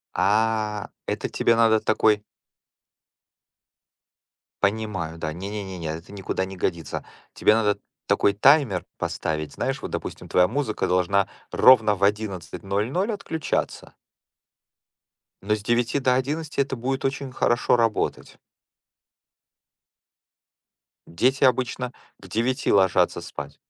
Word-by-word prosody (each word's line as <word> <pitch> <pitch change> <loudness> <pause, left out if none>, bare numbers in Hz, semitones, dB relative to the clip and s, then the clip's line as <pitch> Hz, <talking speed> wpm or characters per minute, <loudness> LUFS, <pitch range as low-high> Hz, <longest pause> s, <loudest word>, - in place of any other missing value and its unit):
А, 105 0 +1 0.2
это - - -2
тебе 115 - +2
надо 115 -1 +4
такой 110 -1 +2 2.4
Понимаю, 100 -6 -1
да. 80 -1 -4
Не-не-не-не, 95 -1 -6
это 80 +4 -6
никуда 95 -1 -2
не 95 0 -8
годится. 85 -3 -3 0.3
Тебе - - +4
надо 105 -2 +2 0.3
такой 100 - +3
таймер 110 - +4
поставить. 75 -2 -3
Знаешь, - - -2
вот, - - -6
допустим, - - -5
твоя 90 0 +4
музыка 125 -1 -1
должна 90 +2 +2 0.2
ровно 110 -5 +6
в 95 - -6
11:00 105 - -1
отключаться. 160 -7 -3 1.5
Но 105 +1 +2
с 105 - -7
9 120 +4 +1
до 130 -1 +2
11 145 +3 -1
это 135 -1 -2
будет 130 +2 -2
очень 135 0 -2
хорошо 120 -1 +2
работать. 115 -2 -1 2.7
Дети 130 +12 +1
обычно 125 -1 +1 0.3
к 95 - -13
9 120 +6 0
ложатся 95 -2 +3
спать. - - -8
105 Hz, 110 wpm, -24 LUFS, 95-125 Hz, 2.7 s, ровно